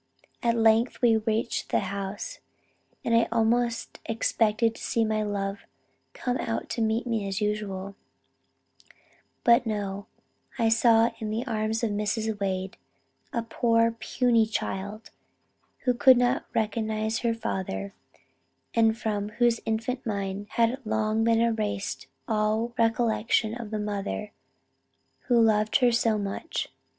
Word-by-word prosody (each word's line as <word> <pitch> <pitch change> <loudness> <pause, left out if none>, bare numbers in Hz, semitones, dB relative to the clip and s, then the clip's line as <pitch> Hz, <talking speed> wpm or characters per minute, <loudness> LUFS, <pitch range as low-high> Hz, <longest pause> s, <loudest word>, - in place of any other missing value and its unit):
At 235 -1 +2
length 225 +2 +3
we 230 -2 +6
reached 220 +1 -1
the - - +2
house; 200 - -5 0.7
and 230 - +1
I 230 - +4
almost 235 +1 0
expected 225 0 +1
to - - -13
see 230 -1 +1
my 215 0 0
love 200 -1 -3 0.5
coming 250 0 -2
out 115 +1 -3
to 235 - -2
meet 220 +2 +1
me 225 -4 -1
as 195 0 -2
usual, 205 -2 -2 1.5
but 235 0 +5
no, 200 -2 -3 0.5
I 235 - 0
only 225 - +4
saw 230 0 +5
in 220 -2 -4
the 225 +4 -2
arms 220 -1 -1
of 225 - +1
Mrs. 210 +1 -1
Wade, 190 -1 -2 0.5
a 235 - -1
poor 230 0 +2
puny 230 0 +1
child, 210 0 -4 0.7
who 250 - +3
could 255 +1 +6
not 245 +2 +1
recognize 220 0 0
her 230 -1 0
father, 100 - -4 0.8
and 225 -1 +3
from 210 -3 -2
whose 235 +1 +2
infant 225 +4 -1
mind 200 -1 -3
had 235 +4 +1
long 220 0 0
been 230 0 +3
erased 215 -4 -1 0.2
all 220 +2 0
recollection 225 -1 +1
of 235 -2 -6
the 215 - -3
mother 210 0 -3 1.0
who 240 -2 +4
loved 215 -1 +3
her 250 -3 +5
so 230 -2 +2
much. 200 +10 -3
220 Hz, 135 wpm, -27 LUFS, 210-230 Hz, 1.5 s, we